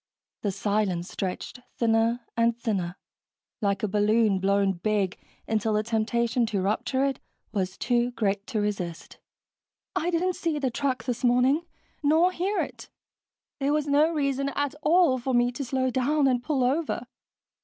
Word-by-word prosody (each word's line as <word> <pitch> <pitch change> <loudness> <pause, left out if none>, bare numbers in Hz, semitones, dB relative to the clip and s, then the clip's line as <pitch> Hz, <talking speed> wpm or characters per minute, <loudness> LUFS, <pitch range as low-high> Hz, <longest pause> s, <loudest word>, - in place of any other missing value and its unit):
The 205 - 0
silence 195 -3 -1
stretched 190 +6 -4 0.2
thinner 230 +1 +2
and 230 0 +2
thinner, 195 -7 -2 0.7
like 200 -1 0
a - - +2
balloon 210 0 +3
blown 195 0 +2
big, 195 +1 0 0.3
until 220 0 0
the 210 0 +1
temptation 235 +1 +1
to 210 -3 -1
rupture 245 +7 0
it 275 -2 -1 0.3
was 190 -3 -2
too 240 0 +1
great 205 -4 -1
to 225 -5 -1
resist. 195 -5 -4 0.8
"I 340 - 0
didn't 360 +2 +1
see 325 -3 -1
the 270 -3 -1
truck 260 +1 -1
this 245 0 -3
morning. 255 +7 +3 0.3
Nor 320 +5 +4
hear 380 +4 -1
it. - - -7 0.7
There 280 +1 +1
was 300 -1 +1
no 295 +3 +3
reason 275 -3 0
at 285 -1 0
all 320 -5 +4
for 255 +1 -1
me 240 0 +3
to 265 +3 -5
slow 260 0 0
down 275 +3 +2
and 250 -2 +2
pull 265 0 0
over." 275 -1 0
240 Hz, 155 wpm, -26 LUFS, 210-275 Hz, 0.8 s, Nor